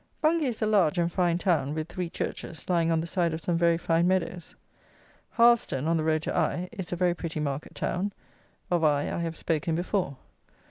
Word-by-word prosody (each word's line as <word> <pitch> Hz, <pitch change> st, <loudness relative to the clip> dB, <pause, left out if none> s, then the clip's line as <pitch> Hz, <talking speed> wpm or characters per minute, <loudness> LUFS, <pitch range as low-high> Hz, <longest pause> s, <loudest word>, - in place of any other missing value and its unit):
Bungay 310 Hz, -1 st, +2 dB
is 235 Hz, -3 st, -2 dB
a -, -, +3 dB
large 200 Hz, -8 st, +3 dB
and 170 Hz, 0 st, +1 dB
fine 175 Hz, -2 st, +1 dB
town, 155 Hz, -6 st, +1 dB
with 155 Hz, 0 st, -3 dB
three 180 Hz, -1 st, -4 dB
churches, 165 Hz, -1 st, -5 dB
lying 170 Hz, -2 st, +2 dB
on 165 Hz, -1 st, +2 dB
the -, -, -4 dB
side 170 Hz, -2 st, 0 dB
of 160 Hz, -, -7 dB
some 175 Hz, +1 st, 0 dB
very 170 Hz, 0 st, +3 dB
fine 170 Hz, +1 st, +2 dB
meadows. 180 Hz, -2 st, -1 dB, 0.7 s
Harleston, 235 Hz, -, +3 dB
on 165 Hz, -, +2 dB
the 160 Hz, -, 0 dB
road 155 Hz, 0 st, +1 dB
to -, -, -2 dB
Eye, 175 Hz, +2 st, 0 dB
is 190 Hz, -6 st, -7 dB
a -, -, 0 dB
very 175 Hz, 0 st, +2 dB
pretty 165 Hz, -2 st, -5 dB
market 145 Hz, -1 st, -4 dB
town: 195 Hz, +4 st, -1 dB, 0.6 s
of 175 Hz, -2 st, +2 dB
Eye, 145 Hz, -2 st, +2 dB
I -, -, -2 dB
have 165 Hz, -1 st, -3 dB
spoken 165 Hz, 0 st, -1 dB
before. 175 Hz, -5 st, -1 dB
170 Hz, 205 wpm, -27 LUFS, 160-180 Hz, 0.7 s, a